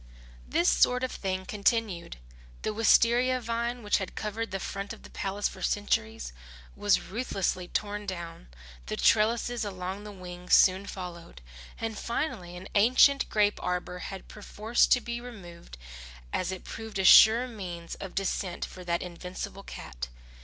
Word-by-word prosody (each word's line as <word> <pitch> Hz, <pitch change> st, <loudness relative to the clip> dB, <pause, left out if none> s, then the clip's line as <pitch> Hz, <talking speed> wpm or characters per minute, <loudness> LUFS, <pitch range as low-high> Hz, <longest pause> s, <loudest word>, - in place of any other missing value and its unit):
This 170 Hz, -, +2 dB
sort 250 Hz, +1 st, +4 dB
of 255 Hz, -, -1 dB
thing 190 Hz, -1 st, -3 dB
continued. 205 Hz, -, 0 dB, 0.5 s
The -, -, 0 dB
wistaria 235 Hz, +3 st, +4 dB
vine 235 Hz, +1 st, -2 dB
which 205 Hz, -, +2 dB
had 190 Hz, -, -6 dB
covered 220 Hz, +2 st, -3 dB
the 195 Hz, -, -3 dB
front 195 Hz, +1 st, -5 dB
of -, -, -13 dB
the -, -, -13 dB
palace 200 Hz, +1 st, -1 dB
for 190 Hz, -, -10 dB
centuries, 220 Hz, -, -1 dB, 0.4 s
was 205 Hz, -1 st, +3 dB
ruthlessly 190 Hz, -4 st, -2 dB
torn 205 Hz, +2 st, -3 dB
down, 170 Hz, -, -6 dB, 0.4 s
the -, -, -3 dB
trellises 235 Hz, +2 st, +3 dB
along 190 Hz, 0 st, -5 dB
the 210 Hz, -, -8 dB
wings 180 Hz, -2 st, 0 dB
soon 190 Hz, +1 st, +5 dB
followed; 175 Hz, -, -8 dB, 0.4 s
and 225 Hz, -1 st, -3 dB
finally 185 Hz, -, -3 dB
an 185 Hz, +2 st, -9 dB
ancient 255 Hz, +6 st, +5 dB
grape 210 Hz, -1 st, +2 dB
arbour 180 Hz, 0 st, -2 dB
had 190 Hz, +1 st, -7 dB
perforce 215 Hz, +2 st, +1 dB
to 250 Hz, -, +4 dB
be 235 Hz, 0 st, -4 dB
removed 175 Hz, -, -11 dB, 0.6 s
as 185 Hz, -, 0 dB
it 185 Hz, -, -6 dB
proved 220 Hz, -2 st, -7 dB
a 190 Hz, -, 0 dB
sure 225 Hz, +6 st, +8 dB
means 180 Hz, -7 st, -7 dB
of 195 Hz, -, -8 dB
descent 195 Hz, -2 st, -2 dB
for 185 Hz, -, -10 dB
that 170 Hz, -1 st, -1 dB
invincible 180 Hz, +2 st, -7 dB
cat. -, -, -7 dB
200 Hz, 155 wpm, -29 LUFS, 180-225 Hz, 0.6 s, sure